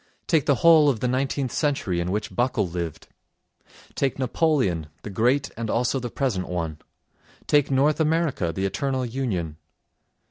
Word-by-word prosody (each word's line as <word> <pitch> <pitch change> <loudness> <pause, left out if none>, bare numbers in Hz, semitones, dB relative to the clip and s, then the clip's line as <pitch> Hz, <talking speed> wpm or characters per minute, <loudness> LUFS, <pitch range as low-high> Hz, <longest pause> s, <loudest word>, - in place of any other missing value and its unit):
Take 160 -5 +1
the 140 - +4
whole 160 -3 +7
of 125 -6 0
the 125 - 0
nineteenth 130 0 -1
century 135 - 0
in 85 +1 -2
which 105 +3 -3
Buckle 120 -5 +1
lived. 85 -2 -5 0.9
Take 135 -2 -1
Napoleon—the 105 - -1
Great 125 +8 +1
and 115 -1 -4
also 125 +4 +1
the 120 -1 -4
present 115 -9 -2
one. 80 -4 -3 0.7
Take 145 -2 +3
North 140 +3 +2
America—the 150 - 0
eternal 130 +7 -1
union. 105 - -3
125 Hz, 140 wpm, -24 LUFS, 90-140 Hz, 0.9 s, whole